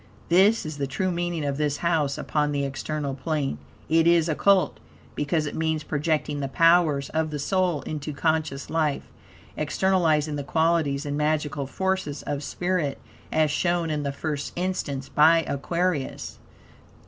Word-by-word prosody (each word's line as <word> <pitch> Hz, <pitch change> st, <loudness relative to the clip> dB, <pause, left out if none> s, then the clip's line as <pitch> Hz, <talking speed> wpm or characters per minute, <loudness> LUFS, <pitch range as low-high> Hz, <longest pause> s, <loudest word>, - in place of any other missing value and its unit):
This 195 Hz, +5 st, +4 dB
is 155 Hz, -1 st, -5 dB
the 140 Hz, -, -1 dB
true 185 Hz, +7 st, -1 dB
meaning 175 Hz, -3 st, -2 dB
of 140 Hz, -1 st, -1 dB
this 150 Hz, -1 st, 0 dB
house 160 Hz, -5 st, 0 dB
upon 150 Hz, -1 st, 0 dB
the 140 Hz, -1 st, 0 dB
external 140 Hz, +1 st, -3 dB
plane. 140 Hz, -, -2 dB, 0.3 s
it 165 Hz, +1 st, +3 dB
is 170 Hz, -1 st, +4 dB
Occult, 185 Hz, +4 st, +2 dB, 0.3 s
because 150 Hz, +2 st, 0 dB
it 145 Hz, -, -4 dB
means 160 Hz, -1 st, -1 dB
projecting 150 Hz, -1 st, -1 dB
the 140 Hz, -, -2 dB
powers 165 Hz, -2 st, +3 dB
of 160 Hz, 0 st, -1 dB
the 150 Hz, -, -4 dB
soul 175 Hz, -1 st, 0 dB
into 150 Hz, 0 st, -4 dB
conscious 155 Hz, -2 st, -1 dB
life, 155 Hz, -3 st, 0 dB, 0.5 s
externalizing 155 Hz, -2 st, +1 dB
the 145 Hz, -, -3 dB
qualities 160 Hz, -2 st, +1 dB
and 145 Hz, 0 st, -2 dB
magical 150 Hz, -2 st, -1 dB
forces 190 Hz, -2 st, -2 dB
of 145 Hz, -1 st, -3 dB
spirit, 175 Hz, -2 st, -2 dB, 0.3 s
as 155 Hz, -2 st, +2 dB
shown 170 Hz, +1 st, 0 dB
in 150 Hz, -1 st, -1 dB
the 140 Hz, -1 st, -2 dB
first 145 Hz, 0 st, -4 dB
instance 175 Hz, -7 st, -2 dB
by 165 Hz, +2 st, +5 dB
Aquarius. 160 Hz, +1 st, -2 dB
155 Hz, 150 wpm, -25 LUFS, 145-170 Hz, 0.5 s, by